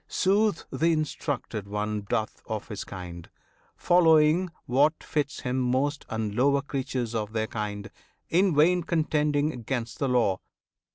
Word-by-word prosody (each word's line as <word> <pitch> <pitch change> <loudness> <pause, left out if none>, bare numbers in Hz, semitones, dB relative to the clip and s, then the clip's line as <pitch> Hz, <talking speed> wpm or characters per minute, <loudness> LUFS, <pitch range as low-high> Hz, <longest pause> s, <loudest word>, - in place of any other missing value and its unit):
'Sooth, 200 -1 +1
the 140 +5 +1
instructed 150 - -2
one 105 +1 -2
Doth 110 +2 -2
of 110 0 -4
his 105 -3 -5
kind, 85 -3 -8 0.5
following 165 0 +4 0.2
what 145 +6 +2
fits 145 -2 -2
him 125 +1 -1
most: 130 +4 0
And 110 -2 -2
lower 140 +4 +2
creatures 130 -4 -3
of 110 -1 -3
their 110 -1 0
kind; 105 -1 -5 0.4
in 180 -1 +3
vain 175 +5 +4
Contending 150 -4 0
'gainst 120 0 -4
the 140 - 0
law. 115 -7 +2
130 Hz, 135 wpm, -27 LUFS, 110-155 Hz, 0.5 s, following